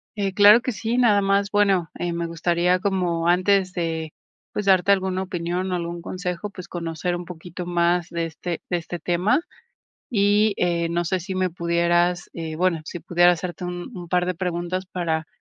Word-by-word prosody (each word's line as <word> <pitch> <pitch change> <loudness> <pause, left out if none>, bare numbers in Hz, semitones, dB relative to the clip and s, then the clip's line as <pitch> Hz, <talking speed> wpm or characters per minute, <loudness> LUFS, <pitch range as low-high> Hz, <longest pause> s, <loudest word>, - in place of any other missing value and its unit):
Eh, 195 -2 -1
claro 210 +3 +8
que 255 - -2
sí, 225 +4 -2
nada 210 -5 +4
más, 200 +1 +2
bueno, 195 -5 +2
eh, 175 -1 -2
me 170 0 -2
gustaría, 175 +2 +1
como 180 -4 0
antes 185 +1 +3
de 160 -2 -3 0.4
pues, 210 - -3
darte 190 +1 +5
alguna 190 -1 +1
opinión, 180 +1 -3
o, - - +1
algún 170 0 -4
consejo, 180 +2 -4
pues, 185 -2 -9
conocer 170 0 -3
un 175 0 -6
poquito 175 +1 -8
más, 175 0 +1
de 170 -1 -2
este 165 +2 -5
de 175 - +1
este 170 +1 -6
tema. 180 - +1 0.7
Y, 205 -1 +3
eh, 170 -1 0
no 170 +1 -1
sé, 185 +2 -1
si 190 +2 -5
me 185 -1 +1
pudieras, 170 +1 +1
eh, 160 -2 -5
bueno, 175 -1 +1
si 175 - -6
pudiera 175 +1 +4
hacerte 180 0 -5
un 175 +6 -6
un 175 -3 -8
par 180 0 +1
de 185 - -1
preguntas 180 +1 -3
para, 165 -3 -2
180 Hz, 185 wpm, -23 LUFS, 170-190 Hz, 0.7 s, claro